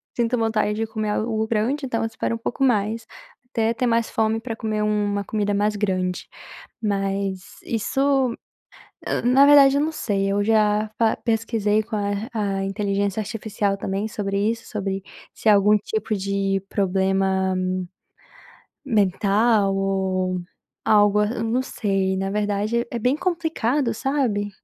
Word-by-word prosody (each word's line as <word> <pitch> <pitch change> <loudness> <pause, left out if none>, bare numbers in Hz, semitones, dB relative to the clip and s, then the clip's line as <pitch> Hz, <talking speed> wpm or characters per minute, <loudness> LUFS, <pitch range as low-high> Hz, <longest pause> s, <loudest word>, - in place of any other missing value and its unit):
sinto 240 +1 +1
vontade 220 -2 +1
de 225 +1 -1
comer 215 -1 -3
algo 220 +1 -1
grande, 245 +6 0
então 230 -3 -2
eu 225 - 0
espero 225 +1 -3
um - - -4
pouco 240 +3 -3
mais, 220 -2 +1 0.4
até 230 -3 0
ter 250 - -1
mais 230 -1 +1
fome 220 0 0
para 230 -1 -5
comer 215 -1 -2
uma 205 -1 0
comida 205 0 -1
mais 210 +1 +1
grande, 185 -3 -1 0.5
mas 195 -2 -1 0.2
isso 265 +2 +1 0.9
na 265 +3 +6
verdade, 280 -1 +7
eu - - +3
não 315 +1 -1
sei. 200 -8 -1
Eu 205 0 +1
já 215 -1 +2
fa 225 -1 +2
pesquisei 220 -2 0
com 225 0 -7
a 205 +2 -2
a 200 -3 -1
inteligência 200 +1 -1
artificial, 210 -2 -2
também, 195 +2 -3
sobre 200 -2 -2
isso, 230 0 -5
sobre, 195 -2 -3 0.3
se 220 - -1
é - - +8
algum 205 +1 +5
tipo 330 - -3
de 195 0 -1
problema 190 -1 +1 1.3
mental 205 -1 +2
ou 190 -1 0 0.5
algo 205 -1 +4
a 210 - +3 0.2
não 235 +3 +1
sei, 195 -6 -1
na 195 0 -2
verdade, 210 +3 -1
é 240 - -2
bem 250 +5 +2
complicado, 300 -8 0
sabe? 225 -6 -1
210 Hz, 145 wpm, -23 LUFS, 200-230 Hz, 1.3 s, é